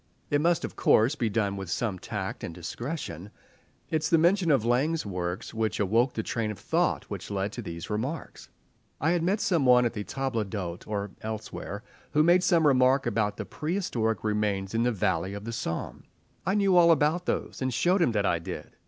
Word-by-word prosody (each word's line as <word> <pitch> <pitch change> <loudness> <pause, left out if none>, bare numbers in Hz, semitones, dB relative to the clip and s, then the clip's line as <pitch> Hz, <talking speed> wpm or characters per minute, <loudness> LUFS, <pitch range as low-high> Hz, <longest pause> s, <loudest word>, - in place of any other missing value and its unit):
It 145 0 +3
must, 170 +1 +2
of - - -8
course, 115 +6 +4
be 120 -7 -1
done 100 -2 0
with 95 -3 -6
some 100 0 -1
tact - - -5
and 85 - -5
discretion. 100 - -5 0.6
It 155 -1 +1
is 155 - -1
the 165 - +5
mention 175 +2 +3
of 135 -7 +3
Laing's 140 +7 +1
works 90 +1 -4
which 110 -2 -1
awoke 115 +6 +2
the 110 - -2
train 110 -1 -2
of 105 - -5
thought - - 0
which - - -7
led 100 0 -2
to - - -6
these 85 0 -7
remarks. 130 +10 -4 0.5
I 160 +4 +2
had 175 -1 +1
met 190 +5 +1
some 170 -7 +1
one 125 -1 +6
at 120 - -1
a 105 - -3
table 130 -2 -2
d'hôte 95 -4 -5
or 100 -2 -3
elsewhere 110 -1 -6 0.3
who 150 +1 +5
made 175 +2 +5
some 170 -3 +3
remark 135 -1 +4
about 105 -3 0
the - - -4
prehistoric 140 - -2
remains 105 -2 -1
in 115 - +1
the 125 +1 +2
valley 95 -2 -1
of 100 +1 -7
the 115 - -4
Somme. 80 -8 -4 0.4
I 190 - +2
knew 200 -3 +3
all 170 -1 +7
about 160 +3 +3
those, - - -2
and 130 0 0
showed 180 - +2
him 125 -9 +3
that 100 -2 +1
I 85 -3 +2
did. 80 - -8
115 Hz, 205 wpm, -28 LUFS, 100-155 Hz, 0.6 s, all